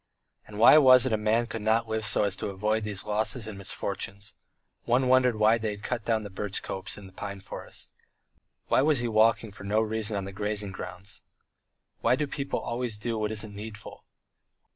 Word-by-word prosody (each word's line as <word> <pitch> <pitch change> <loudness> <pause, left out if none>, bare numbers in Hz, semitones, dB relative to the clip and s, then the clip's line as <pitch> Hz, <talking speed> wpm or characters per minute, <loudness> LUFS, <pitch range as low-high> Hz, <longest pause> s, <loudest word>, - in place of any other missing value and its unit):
And 105 - -10
why 120 +7 +8
was 130 -3 +7
it 130 - 0
a - - +5
man 110 +2 +1
could 115 -1 -6
not 110 +2 +2
live 110 0 -2
so 110 - +2
as 100 -2 0
to - - -4
avoid 105 +3 -1
these 105 -2 -1
losses 110 +2 0
and 110 - -6
misfortunes? 100 +1 -4 0.5
One 125 +2 +2
wondered 125 -2 +4
why 110 +2 +4
they 110 -1 -2
had 105 0 -7
cut 120 -4 -3
down 110 -2 +1
the 100 - -8
birch 100 +1 -3
copse 95 - -5
and 100 -2 -10
the 95 - -16
pine 100 0 -6
forest. 95 - -8 0.8
Why - - +3
was 150 +1 +3
he 120 0 -1
walking 110 0 +3
with 100 - -15
no 100 +2 +1
reason 110 -1 0
on 100 - -3
the 100 - -6
grazing 105 0 -3
ground? 95 +1 -8 0.8
Why 120 +2 +3
do 150 - -1
people 140 -1 -3
always 120 -2 -3
do 115 +1 -3
what 105 0 -1
isn't 110 -1 -4
needful? 105 0 -9
110 Hz, 205 wpm, -28 LUFS, 105-115 Hz, 0.8 s, why